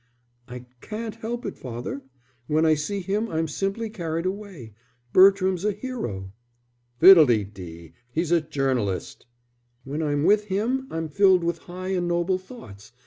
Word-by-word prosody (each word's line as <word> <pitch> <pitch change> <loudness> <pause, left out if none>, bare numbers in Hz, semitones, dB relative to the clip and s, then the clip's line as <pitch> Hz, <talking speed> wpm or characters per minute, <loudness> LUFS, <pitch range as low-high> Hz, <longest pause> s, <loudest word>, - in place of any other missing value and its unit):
"I 125 0 -9 0.2
can't 220 0 -5
help 230 +2 -5
it, - - -6
father. 125 +2 -6 0.5
When 155 +1 +2
I 160 - +5
see 195 +7 -2
him 205 +5 -2
I'm 160 0 -1
simply 195 +8 -2
carried 170 -6 -4
away. 185 - -6 0.4
Bertram's 190 -1 +5
a 210 0 +1
hero." 155 - -6 0.7
"Fiddlededee! 105 - +4 0.2
He's 165 +5 -1
a 170 -1 +4
journalist." 130 -11 -2 0.6
"When 145 +5 -4
I'm 145 -2 0
with 210 +4 +4
him 230 +7 -1
I'm 165 0 -3
filled 185 +2 +4
with 170 0 -1
high 185 +1 -7
and 180 -2 -1
noble 175 +2 0
thoughts. 120 - -13
175 Hz, 140 wpm, -24 LUFS, 140-200 Hz, 0.7 s, I